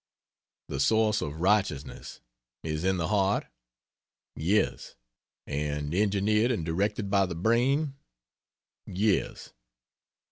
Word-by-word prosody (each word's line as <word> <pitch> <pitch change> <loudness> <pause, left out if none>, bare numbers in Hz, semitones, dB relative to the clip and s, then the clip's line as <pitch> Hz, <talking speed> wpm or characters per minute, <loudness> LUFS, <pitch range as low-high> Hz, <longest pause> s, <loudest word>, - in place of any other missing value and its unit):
The 70 - -4
source 110 +7 +3
of 75 +2 -5
"righteousness" 85 -9 -1 0.4
is 75 0 -3
in 95 0 +2
the 85 0 -1
heart? 100 -1 +1 0.9
Yes. 95 +8 0 0.5
And 75 +1 -3
engineered 105 +3 +2
and 110 -10 -1
directed 100 +4 -1
by 100 -1 +3
the 85 - -5
brain? 125 - +1 0.9
Yes. 100 +2 -1
95 Hz, 100 wpm, -28 LUFS, 80-105 Hz, 0.9 s, source